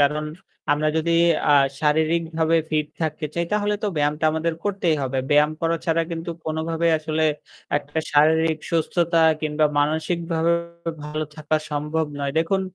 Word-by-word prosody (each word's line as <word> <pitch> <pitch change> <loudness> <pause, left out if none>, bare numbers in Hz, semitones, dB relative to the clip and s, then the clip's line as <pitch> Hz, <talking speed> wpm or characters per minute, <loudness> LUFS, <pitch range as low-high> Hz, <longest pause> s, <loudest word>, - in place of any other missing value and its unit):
কারণ 150 +2 +2 0.5
আমরা 150 +1 +1
যদি 165 +1 +1 0.4
আ - - +7 0.3
শারীরিকভাবে 160 +1 +1
fit 150 -1 +1 0.2
থাকতে 155 0 -2
চাই 170 - 0
তাহলে 210 0 +1
তো - - 0
ব্যায়ামটা 150 +1 0
আমাদের 160 +1 -1
করতেই 185 -6 +1
হবে। 135 0 -1
ব্যায়াম 150 +1 +5
করা 165 0 +1
ছাড়া 165 0 +2
কিন্তু 165 0 -4 0.2
কোনোভাবেই 165 +1 0
আসলে 155 0 -1 0.5
আ - - +2
একটা 145 +2 -6
শারীরিক 160 +2 +4
সুস্থতা 170 +1 +1 0.2
কিংবা 155 0 +1
মানসিকভাবে 165 +2 0 0.5
ভালো 155 +1 -3
থাকা 155 0 0
সম্ভব 150 +2 -1
নয়। 140 -1 -2
দেখুন, 190 +4 +1
160 Hz, 145 wpm, -23 LUFS, 150-165 Hz, 0.5 s, আ